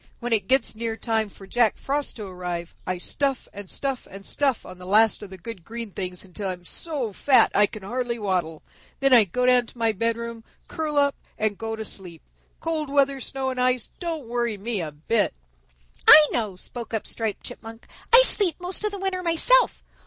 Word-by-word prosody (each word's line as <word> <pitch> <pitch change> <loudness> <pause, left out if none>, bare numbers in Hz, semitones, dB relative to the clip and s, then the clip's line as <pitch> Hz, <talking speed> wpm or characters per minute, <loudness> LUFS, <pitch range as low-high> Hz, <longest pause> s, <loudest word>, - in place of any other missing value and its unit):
"When 240 -1 -1
it 205 -4 +1
gets 265 +1 +2
near 225 0 -3
time 220 -3 0
for 195 - -14
Jack 235 +2 +2
Frost 285 +1 -2
to 215 - -6
arrive, 180 -2 -5
I 185 - -1
stuff 270 +8 -2
and 200 -2 -8
stuff 270 -2 -3
and 195 +1 -10
stuff 275 -5 0
on 185 - -11
the 180 - -10
last 215 +3 +4
of 205 - -8
the 190 - -9
good 195 -1 -8
green 230 +2 -6
things 185 -1 -4
until 190 +1 -4
I'm 180 -1 -6
so 275 - -4
fat 260 +5 +4
I 205 0 +5
can 215 -1 -10
hardly 240 +3 -2
waddle. 180 -7 -2 0.4
Then 275 -1 +4
I 230 -4 +8
go 250 +7 -1
down 250 -1 +4
to - - -15
my 230 -1 +2
bedroom, 230 +2 -2 0.2
curl 310 -2 -3
up 285 -1 +3 0.2
and 215 -1 0
go 225 +2 -4
to 220 0 -6
sleep. 180 -5 -8 0.4
Cold 315 -3 -2
weather, 275 -1 +2
snow 265 0 -3
and 255 -1 -3
ice 250 -1 +1
don't 325 -7 -4
worry 235 -2 -1
me 210 0 -2
a 155 -2 -4
bit." 160 - 0 0.7
"I 305 -1 +11
know," 215 -5 -1
spoke 230 +4 -7
up 220 - -3
Striped 220 -3 -3
Chipmunk. 225 -1 -10 0.3
"I 485 +1 +9
sleep 390 -9 +4
most 360 +3 -5
of 425 - +1
the 405 - -6
winter 380 -1 -2
myself. 360 +9 +3
230 Hz, 205 wpm, -24 LUFS, 200-270 Hz, 0.7 s, I